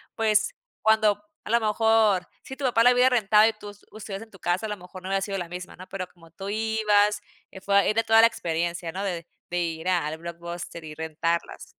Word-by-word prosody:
pues, 220 - +2 0.3
cuando, 220 +2 +3 0.2
a - - -9
lo 235 +1 +4
mejor, 215 -3 +3 0.2
si 265 - -8
tu 275 0 -4
papá 230 -2 +3
la 245 +1 +7
hubiera 250 +1 +5
rentado, 215 -2 +5
y 225 - -4
tu 205 -1 -10
s 205 - -20
ustedes 210 -2 -7
en 225 - -11
tu 195 - -16
casa 180 +6 -1
a - - -7
lo 210 - -3
mejor 180 0 -12
no 185 - -7
había 195 0 +1
sido 195 0 -3
la 175 - -5
misma, 180 +1 -8
¿no? 185 +1 -11
Pero 185 -1 -5
como 165 -2 -20
tú 195 +4 -7
ibas, 210 -1 +2 0.3
eh, 190 - -12
fue 200 +1 +2
ahí 200 +1 +4
de 225 +1 +2
toda 225 0 +6
la 230 - +8
experiencia, 170 -4 -3
¿no? 190 +4 -4
De 175 -4 -3 0.2
de 175 0 -1
ir 165 0 -3
al 160 -4 0
blockbuster 170 0 -7
y 155 -1 -9
rentarlas. 160 +1 -2
195 Hz, 235 wpm, -26 LUFS, 175-220 Hz, 0.3 s, la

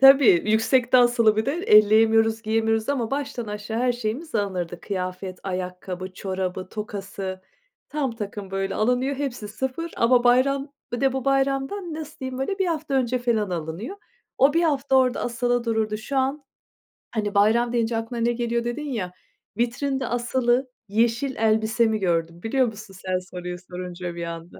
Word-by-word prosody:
Tabii, 270 -10 +8
yüksekte 240 +3 +4
asılı 240 -3 +4
bir 220 +3 0
de 275 - +1
elleyemiyoruz, 225 - +5
giyemiyoruz 225 +1 +1
ama, 250 -5 0
baştan 275 -4 -3
aşağı 210 +2 -4
her 250 0 +2
şeyimiz 240 +7 -4
alınırdı. 180 -5 -2
Kıyafet, 185 -1 -4
ayakkabı, 185 0 -5
çorabı 185 -1 -3
tokası, 195 -3 -5 0.5
tam 290 -4 -1
takım 205 -2 -6
böyle 195 0 -2
alınıyor, 250 +5 +1
hepsi 255 -6 -4
sıfır 265 +9 -4
ama 240 +1 +4
bayram 275 +3 +3 0.2
bir 240 - -2
de 270 -1 +3
bu 265 0 -3
bayramdan, 275 +6 0
nasıl 310 -1 -7
diyeyim 260 -1 -5
böyle, 385 +9 -2
1 385 - +2
hafta 310 -4 -2
önce 255 -1 +1
falan 225 -5 0
alınıyor. 175 - -4 0.4
O 275 +2 +5
1 335 - +4
hafta 280 -4 +2
orada 255 -1 +3
asılı 245 0 0
dururdu. 220 -2 0
Şu 240 +6 -5
an, 270 +3 0 0.7
hani, 210 -2 -2
bayram 230 +4 +4
deyince 230 -1 +1
aklına 230 +1 -4
ne 235 +1 +3
geliyor 235 0 -1
dedin 285 +5 -3
ya. 185 -7 -3 0.5
Vitrinde 260 +2 -1
asılı 245 +1 +1 0.2
yeşil 235 +5 +1
elbisemi 220 0 +2
gördüm, 170 -2 -1
biliyor 255 +3 +2
musun? 210 -3 -8
Sen 185 0 +1
soruyu 180 -1 -7
sorunca 180 -1 -5
bir 170 - -4
anda. 170 0 -7
230 Hz, 160 wpm, -24 LUFS, 200-265 Hz, 0.7 s, Tabii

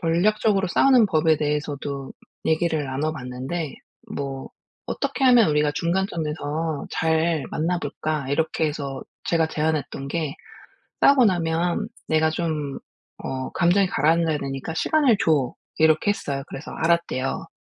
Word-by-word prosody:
전략적으로 195 +3 +2
싸우는 255 +1 +5
법에 160 -2 +3
대해서도 145 -2 -3 0.3
얘기를 160 -2 +1
나눠봤는데 135 +2 -3 0.4
뭐 135 -1 -4 0.4
"어떻게 275 -1 -2
하면 245 -7 +6
우리가 150 0 +2
중간점에서 160 -4 -2
잘 160 -2 +1
만나볼까?" 155 -3 -2
이렇게 160 +1 +1
해서 140 -3 -4 0.2
제가 165 -1 +2
제안했던 150 -3 -2
게 155 -2 -2 0.7
"싸우고 270 -3 +6
나면 175 +2 +1 0.2
내가 160 0 +3
좀 155 -4 -3 0.4
어 130 0 -4
감정이 180 +3 +3
가라앉아야 160 0 +2
되니까 135 +3 -5
시간을 260 - +3
줘." 145 -6 +2 0.2
이렇게 160 +5 +3
했어요. 140 -8 -4
그래서 135 - -8
알았대요. 165 -5 0
160 Hz, 305 characters per minute, -24 LUFS, 145-170 Hz, 0.7 s, 하면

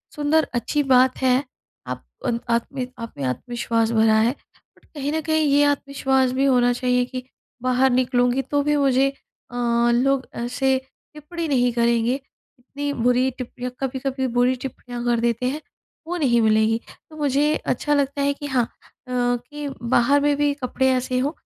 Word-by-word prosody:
सुंदर 295 +1 +2
अच्छी 275 +5 0
बात 255 0 +4
है 260 +1 +3 0.4
आप - - -6 0.2
उन 235 -2 0
आप 235 0 +1
में 255 -2 -3
आप 230 0 -7
में 140 - -4
आत्मविश्वास 230 - -1
भरा 220 -1 +4
है, 230 +3 +3 0.5
बट - - -25
कहीं 290 -1 -4
न 320 - 0
कहीं 315 0 +1
ये 285 +1 +4
आत्मविश्वास 270 -2 +1
भी 265 +2 +1
होना 245 -2 +4
चाहिए 250 0 +1
कि 255 0 -6 0.4
बाहर 255 +1 +3
निकलूँगी 245 0 +2
तो 285 +2 -1
भी 295 +1 +1
मुझे 275 -1 +3 0.4
अ, - - -9 0.4
लोग 265 +2 +2
ऐसे 250 +3 0 0.4
टिप्पणी 325 +3 -5
नहीं 250 -4 +2
करेंगे, 235 0 +2 0.5
इतनी 285 +3 -5
बुरी 250 +2 +2
टिप्पणियाँ 250 0 -6
कभी-कभी 265 0 -2
बुरी 250 +1 +3
टिप्पणियाँ 245 -2 -7
कर 240 -1 +2
देते 235 +1 0
हैं, 300 +4 -4 0.5
वो 355 +1 -2
नहीं 240 -7 +3
मिलेगी। 220 +1 +3 0.3
तो 310 - -13
मुझे 290 +1 +2
अच्छा 295 - 0
लगता 280 0 0
है 280 0 +2
कि 290 - -9
हाँ 255 -4 +1
अ, - - -19 0.4
कि 245 +4 -2
बाहर 250 +4 +3
में 290 0 +2
भी 290 0 +2
कपड़े 265 +1 +1
ऐसे 255 0 -1
हों 280 +4 0
255 Hz, 170 wpm, -22 LUFS, 245-280 Hz, 0.5 s, बात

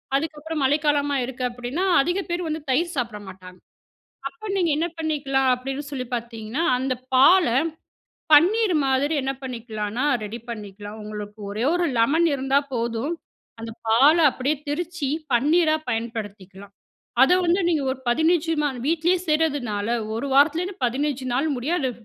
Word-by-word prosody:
அதுக்கப்புறம் 310 +1 -3
மழைக்காலமா 290 0 +2
இருக்கு 255 0 -6
அப்டின்னா 245 +9 -3 0.2
அதிக 350 +7 -1
பேர் 345 0 -2
வந்து 315 0 -3
தயிர் 340 +6 +1
சாப்பிட 230 -4 -2
மாட்டாங்க. 185 -1 -12 0.7
அப்ப 280 +10 -10
நீங்க 345 -4 +2
என்ன 330 +2 0
பண்ணிக்கலாம் 280 -4 0
அப்டின்னு 270 +3 -4
சொல்லி 260 -3 -4
பார்த்தீங்கன்னா, 230 +4 -4
அந்த 260 +1 -1 0.2
பால 335 +8 +6 0.9
பன்னீர் 375 +6 +5
மாதிரி 270 +4 +1
என்ன 265 +1 -1
பண்ணிக்கலானா 230 -2 -4 0.2
ரெடி 215 +3 -6
பண்ணிக்கலாம். 205 -1 -8
உங்களுக்கு 210 0 -7
ஒரே 215 +4 -2
ஒரு 355 -1 +1
லெமன் 300 +9 +3
இருந்தா 270 0 +2 0.2
போதும் 235 +6 -2 0.5
அந்த 225 0 -6 0.2
பால 270 +8 +6
அப்டியே 275 +4 -1
திரிச்சி 330 0 -3 0.2
பன்னீரா 310 +6 +3
பயன்படுத்திக்கலாம். 205 -4 -5 0.5
அத 270 - +6
வந்து 350 +3 +3
நீங்க 320 -4 +1
ஒரு 260 - -8
15 320 +5 +2 0.4
வீட்டிலேயே 335 +3 +2
செய்றதுனால 280 -10 0 0.3
1 245 +5 -3
வாரத்துலேருந்து 325 +5 +2
15 270 +2 -2
நாள் 275 +5 +1
முடியும் 300 +9 -1
அத 260 -2 0
270 Hz, 135 wpm, -23 LUFS, 235-320 Hz, 0.9 s, பால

